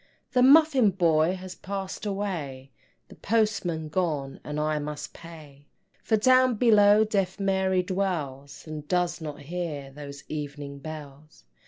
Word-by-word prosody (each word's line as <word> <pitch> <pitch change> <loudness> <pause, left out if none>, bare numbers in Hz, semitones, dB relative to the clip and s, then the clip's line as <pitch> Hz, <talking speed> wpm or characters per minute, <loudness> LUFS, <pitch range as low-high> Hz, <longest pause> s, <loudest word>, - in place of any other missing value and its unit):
The 250 - +3
Muffin 275 -3 +6
boy 170 -2 +2
has 185 0 -8
passed 195 +2 -5
away, 160 -10 -4 0.4
The - - -12
Postman 200 -8 0
gone 150 -6 -2
and 150 0 -4
I 155 0 0
must 150 0 -6
pay, 150 -4 -13 0.3
For 220 - +1
down 255 +2 +4
below 210 -2 +5
Deaf 195 -3 -1
Mary 190 -1 +1
dwells, 160 -9 -3
And 155 -2 -7
does 175 -1 0
not 150 -2 -6
hear 150 -3 -5
those 140 0 -9
Evening 145 -2 -6
Bells. 150 - -10
170 Hz, 135 wpm, -26 LUFS, 150-195 Hz, 0.4 s, Muffin